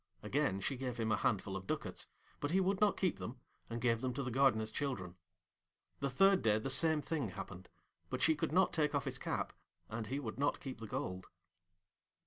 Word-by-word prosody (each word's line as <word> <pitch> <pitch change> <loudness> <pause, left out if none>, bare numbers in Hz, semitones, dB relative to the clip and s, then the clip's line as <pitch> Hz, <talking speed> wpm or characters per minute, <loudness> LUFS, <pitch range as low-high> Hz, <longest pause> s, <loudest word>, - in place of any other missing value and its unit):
Again 135 -9 +1
she 130 +7 -1
gave 125 -2 -3
him 110 -1 0
a - - +5
handful 100 -2 0
of 95 0 -5
ducats, - - -3 0.3
but 145 - -1
he 185 +4 +3
would 190 +1 +1
not 210 -1 +4
keep 185 -3 +1
them, 120 +2 -6 0.3
and 115 0 -3
gave 115 -1 +2
them 125 -1 -1
to 140 - -1
the 130 - -3
Gardener's 115 -4 +3
children. 95 -12 -3 0.8
The 140 - 0
third 195 +8 +5
day 105 -1 +4
the 120 +5 -1
same 155 +2 +4
thing 145 -9 -1
happened, 90 0 -8 0.4
but - - -2
she 160 - +5
could 150 - -2
not 185 +3 +4
take 150 -2 +2
off 140 - 0
his - - -2
cap, - - -2 0.4
and 110 0 -4
he 135 +4 -2
would 115 -3 -5
not 145 - +1
keep 130 -4 -6
the 115 - -6
gold. 105 -7 -4
130 Hz, 210 wpm, -36 LUFS, 110-150 Hz, 0.8 s, a